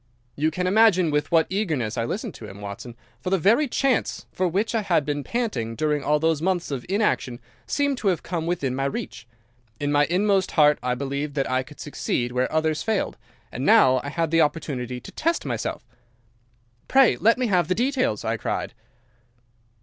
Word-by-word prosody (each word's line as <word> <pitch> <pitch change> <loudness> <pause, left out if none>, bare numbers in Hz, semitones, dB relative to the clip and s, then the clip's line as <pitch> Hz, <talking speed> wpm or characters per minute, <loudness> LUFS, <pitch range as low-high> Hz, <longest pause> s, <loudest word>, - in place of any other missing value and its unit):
"You 155 +2 +1
can 180 +3 -3
imagine 185 -4 +4
with 150 +3 -1
what 165 -1 +4
eagerness 155 - -1
I 115 -2 -1
listened - - -4
to - - -10
him, 100 - -11
Watson, 105 +4 -8 0.2
for 185 - -4
the 195 - +3
very 225 - +3
chance 270 0 0
for 185 - 0
which 200 +7 -1
I 225 - +1
had 170 -7 +1
been 145 -1 -2
panting 170 - -2
during 150 +1 0
all 150 +1 +2
those 160 0 +1
months 175 -2 -1
of 130 -3 -4
inaction 190 - 0 0.3
seemed 285 -3 0
to 210 - -2
have 180 -5 +1
come 170 -2 -3
within 145 -7 -1
my 135 +1 -1
reach. 135 -4 -5 0.5
In 145 0 -1
my 145 0 +4
inmost 195 +2 +1
heart 150 -2 +5
I 125 0 -1
believed 140 +2 -4
that 135 -2 0
I 130 0 +2
could 145 +3 -13
succeed 125 -4 -2
where 125 +1 0
others 155 -1 0
failed, 220 -3 -1 0.4
and - - -5
now 130 -1 +5
I 145 - -4
had 165 +1 -1
the 165 0 +4
opportunity 130 -6 -2
to - - -11
test 335 +2 -1
myself. - - -3 1.0
"'Pray, 265 -2 +5
let 230 +2 +3
me 255 - 0
have 180 -7 +2
the 185 - +1
details,' 250 - 0
I - - 0
cried. - - -3
160 Hz, 195 wpm, -24 LUFS, 135-195 Hz, 1.0 s, heart